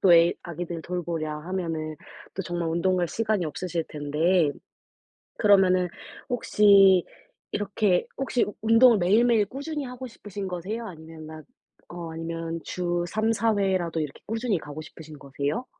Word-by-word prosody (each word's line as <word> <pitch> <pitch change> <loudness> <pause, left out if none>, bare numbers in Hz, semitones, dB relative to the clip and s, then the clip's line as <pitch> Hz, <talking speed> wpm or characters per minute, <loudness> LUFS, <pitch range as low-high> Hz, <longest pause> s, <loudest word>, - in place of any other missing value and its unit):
또 185 -3 +6
애 170 +1 +6
아기들 170 0 -5
돌보랴 165 -4 -3
하면은 165 -3 -3 0.4
또 190 - -3
정말 175 -2 -2
운동 175 +3 +1
갈 175 -1 +1
시간이 215 -1 0
없으실 165 +1 -3
텐데 155 +3 +1 0.9
그러면은 190 -3 +5 0.4
혹시 200 -6 +5 0.5
이렇게 205 -2 +1
혹시 260 -3 +1 0.2
운동을 225 +2 +6
매일매일 215 +4 +4
꾸준히 285 +6 -5
하고 250 0 -7
싶으신 205 -3 -7
거세요? 190 +6 -4
아니면 160 -2 -10
난 155 0 -9 0.5
어 170 -2 -7
아니면 165 0 -4
주 175 -1 -2
3-4 220 +1 +1
회라도 185 -4 0
이렇게 150 -3 -5
꾸준히 225 -2 -1
가고 150 0 -7
싶으신 155 -1 -12
거세요? 140 - -3
180 Hz, 305 characters per minute, -26 LUFS, 165-210 Hz, 0.9 s, 또